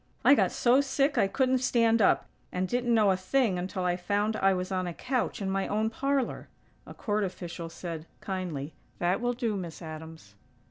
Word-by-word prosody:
I - - +9
got - - +3
so 255 +3 +4
sick 275 +1 +1
I - - +4
couldn't 260 +4 +2
stand 230 -3 +3
up, - - +4 0.3
and 185 +1 -1
didn't 245 +3 0
know 210 -3 +5
a - - +3
thing 185 +1 +1
until 185 0 -3
I 175 0 +1
found 205 +4 0
I 195 -2 +3
was 185 0 -2
on 185 -1 -1
a 170 - -5
couch 250 -4 -2
in 190 - -1
my 195 0 0
own 215 +2 0
parlor." 275 +1 -1 0.4
A - - -10
court 210 -1 -1
official 175 -3 -5
said, 165 -1 -7
kindly: 170 -7 -4 0.2
"That 175 +5 0
will 245 0 +1
do, 235 -3 -1
Miss 170 -5 -6
Adams." 160 - -9
195 Hz, 195 wpm, -29 LUFS, 180-240 Hz, 0.4 s, I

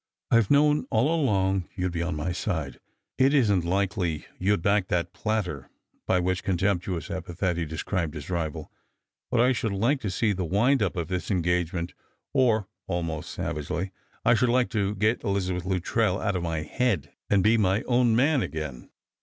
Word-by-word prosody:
"I've 115 -4 +4
known 150 +1 +4
all 125 +9 +2
along 95 - +1
you'd 90 -1 -1
be 85 -1 -2
on 85 -1 -2
jny 85 +4 -2
side. 80 -8 -3 0.4
It 135 +3 +5
isn't 105 - +3
likely 90 -3 -1
you'd 95 -2 +1
back 100 -2 +2
that 85 0 -1
plater," 100 - -2 0.2
— - - -44
by 90 - +3
which 90 +1 0
contemptuous 90 -3 -1
epithet 90 +1 -2
he 85 0 -2
described 80 +1 -3
his 75 - -7
rival. 85 -4 -3 0.3
" - - -62
But 120 -2 +2
I 125 +2 +4
should 115 -4 -1
like 120 +8 +1
to 105 - -2
see 105 +4 +1
the 95 -1 -2
wind 115 - +2
up 95 -3 0
of 85 -3 -2
this 90 0 -3
engagement, 90 -2 0 0.4
or," 115 -7 +3 0.2
almost 85 -4 -3
savagely, 85 +5 -3 0.2
" - - -35
I - - +6
should 120 +1 +2
like 125 +1 +2
to 105 -2 0
get 110 +4 +1
Elizabeth 95 -4 -1
Luttrell 95 +2 0
out 100 -3 -1
of 90 - -1
my 80 -2 -2
head, 105 - -1 0.2
and 100 -2 +3
be 110 +3 +5
my 100 0 +2
own 120 -2 +3
man 140 +3 +3
again." 75 - -5
95 Hz, 185 wpm, -26 LUFS, 85-110 Hz, 0.4 s, I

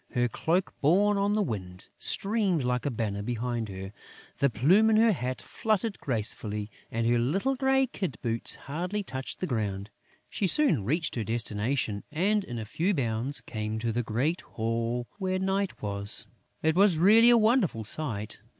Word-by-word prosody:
Her 120 0 +3
cloak, 170 - -1
borne 200 +7 +3
on 200 +1 +1
the 210 0 +2
wind, 90 - -6
streamed 195 - +1
like 125 +2 -1
a - - +2
banner 105 -5 -2
behind 120 0 -3
her; 95 +1 -7 0.5
the 140 - +3
plume 175 - +4
in 220 - +4
her 225 +1 +5
hat 130 - -3
fluttered 215 -1 -1
gracefully; 105 -3 -2 0.2
and 115 0 -2
her 120 +1 +3
little 190 - +1
grey 265 0 +2
kid 190 - -4
boots 115 -1 +2
hardly 180 +8 -4
touched 130 -6 -5
the - - +1
ground. 105 - -3 0.4
She 195 - -1
soon 270 - +3
reached 155 - 0
her 115 - -2
destination 110 0 -1
and, 200 +7 +1
in 120 -7 -6
a 110 - -4
few 170 - 0
bounds, 125 +1 -1
came 110 -1 -4
to 115 +1 -1
the 120 +2 0
great 125 +10 -1
hall 115 +2 -2
where 185 -1 0
Night 190 - -1
was. 100 +1 -4 0.4
It 160 0 +2
was 195 -3 +5
really 220 +7 +7
a 240 - +7
wonderful 215 - +2
sight. 110 -3 -2
130 Hz, 170 wpm, -28 LUFS, -, 0.5 s, really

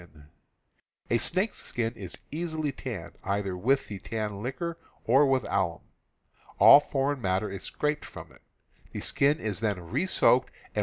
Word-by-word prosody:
A 120 - +4
snake's 190 - +1
skin 115 -1 -2
is 95 -4 -8
easily 155 -1 -2
tanned, 115 -10 -7
either 100 -1 -2
with 130 +10 +1
the 100 -2 -7
tan 105 -1 -4
liquor 165 +8 -4 0.3
or 135 +5 +5
with 135 -1 +2
alum. 95 -4 -1 0.8
All - - +9
foreign 140 -1 -1
matter 95 +1 0
is 100 - -6
scraped 150 0 -2
_. - - -9
from - - -11
it; - - -20 0.5
the - - -4
skin 145 +3 +2
is 105 -5 -2
then 105 -4 -1
re 185 - 0
soaked 130 -8 +3 0.2
and, - - -13
^^ - - +3
120 Hz, 165 wpm, -28 LUFS, 100-145 Hz, 0.8 s, All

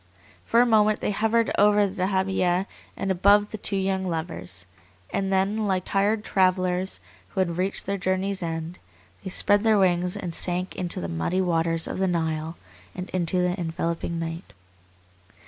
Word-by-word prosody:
For 235 - +4
a - - +5
moment 215 -2 +3
they - - -1
hovered 225 +2 +1
over 205 0 +5
the 190 -1 -5
dahabiyeh 190 -1 +1 0.3
and 195 -1 -1
above 200 +3 +4
the 215 - -4
two 200 0 -2
young 190 0 0
lovers, 160 - -4 0.5
and 195 0 -1
then, 200 +3 +1
like 185 -2 0
tired 210 +2 +1
travellers 185 -1 +1 0.3
who - - -5
had 175 -2 0
reached 190 +2 -1
their 200 0 -2
journey's 190 +1 -1
end, 165 +1 -4 0.4
they 190 - -5
spread 205 +2 +2
their 220 -2 +4
wings 180 -2 +2
and 175 -2 -5
sank 180 +2 0
to 180 -2 -3
the 85 - -3
muddy 85 - -1
waters 165 -2 +1
of - - -4
the 190 - +2
Nile 160 -1 -2 0.4
and 180 0 -6
into 180 0 +1
the 180 0 +1
enveloping 170 0 -2
night. 165 +1 -5
185 Hz, 165 wpm, -25 LUFS, 170-195 Hz, 0.5 s, a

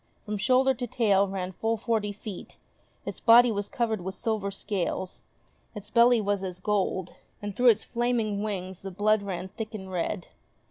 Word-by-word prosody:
From 210 -1 -3
shoulder 260 +4 +4
to 245 0 -4
tail 200 -4 +3
ran 190 -1 -4
full 225 +4 -1
forty 220 -2 -1
feet, 205 -1 -9 0.5
its - - -5
body 240 +1 +7
was 205 -1 -3
covered 225 -5 -1
with 190 +2 -5
silver 215 -2 -1
scales, 190 -2 -3 0.5
its 210 +1 -9
belly 235 0 +6
was 205 -2 0
as 185 -2 -5
gold, 190 -2 -1 0.3
and 205 -1 -5
through 250 +2 +3
its 220 -2 +3
flaming 235 -4 0
wings 190 -3 -4
the 195 - -6
blood 210 +3 +2
ran 190 -2 -5
thick 220 +2 -6
and 190 -2 -7
red. 180 +1 -3
205 Hz, 175 wpm, -27 LUFS, 190-225 Hz, 0.5 s, body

